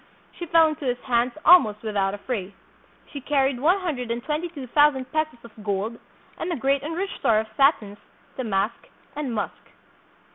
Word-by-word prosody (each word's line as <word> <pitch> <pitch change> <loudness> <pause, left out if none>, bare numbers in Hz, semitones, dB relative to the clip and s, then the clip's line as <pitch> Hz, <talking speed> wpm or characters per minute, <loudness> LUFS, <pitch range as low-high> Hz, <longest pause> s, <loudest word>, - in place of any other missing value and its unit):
She 345 - -8
fell 330 0 +6
into 305 -2 -5
his 245 -1 0
hands 240 -1 +1
almost 225 - +6
without 200 -2 -1
a - - -9
fray. 200 -4 -5 0.6
She 285 - -6
carried 270 -2 +1
one 350 +8 +3
hun 350 -4 -1
dred 250 -1 -5
and 235 +1 -3
twenty 310 +3 -2
two 290 -6 -8
thousand 265 0 +2
pesos 310 -4 -1
of 225 -2 -14
gold 205 +3 -2 0.4
and 345 - -3
a - - 0
great 275 +1 +1
and 315 +3 -5
rich 390 +3 -3
store 230 -5 +3
of 220 - 0
satins, 220 -8 +2 0.4
damask, 215 -3 -2 0.3
and 290 -4 -3
musk. 215 -3 -4
260 Hz, 185 wpm, -24 LUFS, 220-300 Hz, 0.6 s, fell